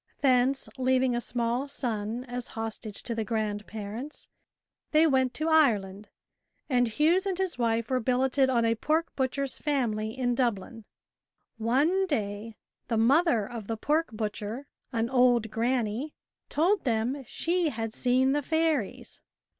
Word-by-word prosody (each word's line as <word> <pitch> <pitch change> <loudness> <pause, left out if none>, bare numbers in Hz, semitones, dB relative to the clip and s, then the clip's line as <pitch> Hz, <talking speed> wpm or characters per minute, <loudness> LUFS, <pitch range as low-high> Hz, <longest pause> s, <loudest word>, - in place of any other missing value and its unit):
Thence, 260 0 +3
leaving 255 -1 +2
a 240 - -1
small 240 +3 -1
son 230 -3 -3
as 245 -1 -5
hostage 225 -1 -4
to 235 - -3
the 225 -1 -2
grandparents, 215 +3 -4 0.6
they 310 +1 +5
went 260 -4 +2
to 310 - -1
Ireland, 210 -11 +2 0.6
and 245 -3 +2
Hughes 325 - +2
and 375 -2 -1
his 375 -7 -2
wife 230 0 0
were 255 - +2
billeted 260 +2 +2
on 235 -3 +2
a 230 - +3
pork 310 +8 -1
butcher's 270 0 -1
family 225 -6 -1
in 245 -2 +1
Dublin. 230 -2 -2 0.7
One 295 - +2
day, 215 - -3 0.3
the 230 - 0
mother 240 - +3
of 230 -4 -7
the 225 - -3
pork 305 +8 +1
butcher, 215 +3 -4 0.3
an 230 -2 0
old 245 -3 +3
granny, 240 +3 -1 0.3
told 365 +7 +2
them 245 +3 -1
she 345 +3 0
had 225 -4 -4
seen 255 +2 +2
the 290 +1 +1
fairies. 320 -6 -1
245 Hz, 140 wpm, -28 LUFS, 225-280 Hz, 0.7 s, they